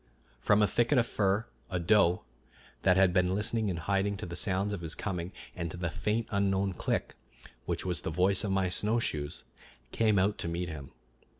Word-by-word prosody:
From 105 +10 +3
a - - +4
thicket 120 +6 +2
of 120 - +4
fir 105 -1 0 0.2
a 95 - -1
doe, 90 0 +3 0.6
that 90 0 +4
had 95 -2 +4
been 90 0 +2
listening 105 +1 +1
in 90 - -2
hiding 100 +4 0
to - - -5
the 85 -1 -6
sounds 95 +3 0
of 100 - -4
his 80 -1 -1
coming 90 -3 -4 0.2
and 85 -2 -3
to 85 - -6
the 85 -2 -2
faint 110 +6 -1
unknown 100 -1 +1
click, - - -2 0.5
which - - -2
was 90 -2 -1
the - - -3
voice 90 +4 +2
of 105 - -1
my 95 -1 +2
snowshoes, 90 -7 -1 0.5
came 110 -2 +2
out 100 +2 +2
to - - -2
meet 85 +1 -3
him. 70 -4 -8
95 Hz, 195 wpm, -30 LUFS, 90-105 Hz, 0.6 s, a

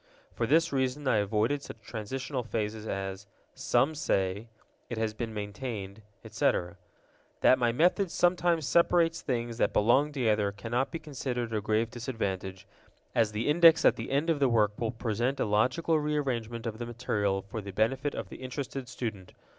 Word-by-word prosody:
For - - -1
this 165 -1 +3
reason 130 +1 -1
I 115 - +4
avoided 110 +7 +1
such 110 - -10
transitional 125 +5 -4
phrases 110 -1 -3
as 95 0 -4 0.3
"Some 130 +6 +1
say," 100 -6 -1 0.4
"It 120 - -4
has 110 -1 -1
been 115 +1 -4
maintained," 105 -1 -5 0.2
etc. 90 +1 0 0.6
That 130 - +5
my 120 -1 +3
method 180 - +2
sometimes 175 -2 +2
separates 170 +1 +3
things 120 -3 -3
that - - +2
belong 130 +8 +3
together 110 -7 +1
cannot 115 +6 -2
be - - -4
considered 130 -6 -4
a 105 - 0
grave 110 +2 0
disadvantage, 100 -6 -4 0.5
as 110 -2 +2
the 105 +4 -2
Index 165 +1 +6
at - - +6
the - - -6
end 145 +5 +1
of 155 - 0
the 135 -2 +3
work 110 -3 +3
will 115 - 0
present 120 +3 -1
a - - +2
logical 130 +10 +2
rearrangement 125 -6 -2
of 110 -1 -4
the 120 - -4
material 105 -5 -1
for 105 +3 -6
the 100 - -8
benefit 130 +8 0
of - - -5
the - - -9
interested 130 0 -5
student. 110 -7 -5
120 Hz, 170 wpm, -29 LUFS, 105-140 Hz, 0.6 s, Index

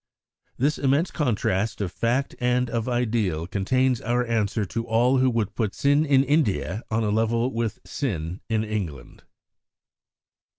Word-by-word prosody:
This 145 +4 +1
immense 140 +6 +2
contrast 110 - 0
of 100 -4 -2
fact 120 +7 0
and 125 0 +1
of 115 +1 -1
ideal 110 -9 0
contains 125 +7 +1
our 120 +2 0
answer 110 -2 0
to 115 +5 -3
all 120 +4 +3
who 130 0 +4
would 115 -4 -1
put 110 -4 -2
sin 145 +2 +3
in 135 -2 +4
India 110 - 0
on 110 +1 0
a 105 - 0
level 115 +3 +1
with 115 -2 -2
sin 90 - -3
in 110 -1 +1
England. 95 - -5
115 Hz, 145 wpm, -25 LUFS, 105-130 Hz, -, who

